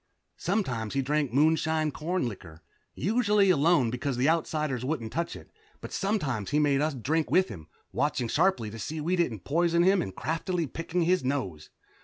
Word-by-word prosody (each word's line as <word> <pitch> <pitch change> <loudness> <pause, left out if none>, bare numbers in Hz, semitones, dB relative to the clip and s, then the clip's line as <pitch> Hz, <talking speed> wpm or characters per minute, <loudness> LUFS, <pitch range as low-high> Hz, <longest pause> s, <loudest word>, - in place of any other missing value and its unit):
Sometimes 135 - -1
he 135 - +1
drank 145 -1 0
moonshine 155 +2 +2
corn 170 0 -2
liquor, 85 -7 -10 0.3
usually 210 - +3
alone, 150 -6 +3
because 125 +1 -2
the 130 +3 +2
Outsiders 155 -5 0
wouldn't 125 -5 -3
touch 170 +1 -2
it, - - -13 0.3
but - - -9
sometimes 150 - -1
he 145 - +1
made 145 -2 +3
some 150 - +3
of 155 - -4
us - - -7
drink 160 +2 0
with 185 0 +3
him, 80 -6 -9 0.2
watching 140 -4 0
sharply 160 - +1
to 115 - -8
see 155 +8 -4
we 170 +5 0
didn't 125 - -1
poison 170 +3 +2
him 190 +1 +4
and 95 - -5
craftily 165 +3 -2
picking 165 +4 -2
his 180 +1 +2
nose. 125 - -3
150 Hz, 185 wpm, -28 LUFS, 125-170 Hz, 0.3 s, him